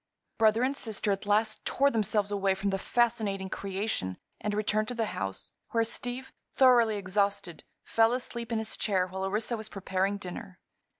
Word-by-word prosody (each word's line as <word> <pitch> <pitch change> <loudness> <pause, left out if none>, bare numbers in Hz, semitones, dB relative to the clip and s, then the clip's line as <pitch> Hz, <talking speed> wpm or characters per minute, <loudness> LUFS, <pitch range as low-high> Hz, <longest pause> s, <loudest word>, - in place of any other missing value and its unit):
Brother 220 +1 +4
and 270 +2 +1
sister 215 -4 -2
at 200 +1 -2
last 215 +1 +2
tore 280 +1 +3
themselves 210 -2 +1
away 195 -1 +2
from 195 +1 -1
the 195 - -1
fascinating 220 -5 0
creation 195 - -2 0.2
and 210 - -2
returned 215 0 +1
to 245 - -4
the 230 -1 0
house, 95 -1 -4 0.2
where 230 -1 +4
Steve, 245 +3 -3 0.2
thoroughly 240 -5 +5
exhausted, 200 -2 -1 0.2
fell 225 0 +3
asleep 240 -2 -4
in 230 - +1
his 220 -1 -2
chair 190 -4 +1
while 190 +1 -5
Orissa 210 +5 0
was 215 0 -5
preparing 195 0 -1
dinner. 180 -1 -8
210 Hz, 170 wpm, -29 LUFS, 195-230 Hz, 0.2 s, thoroughly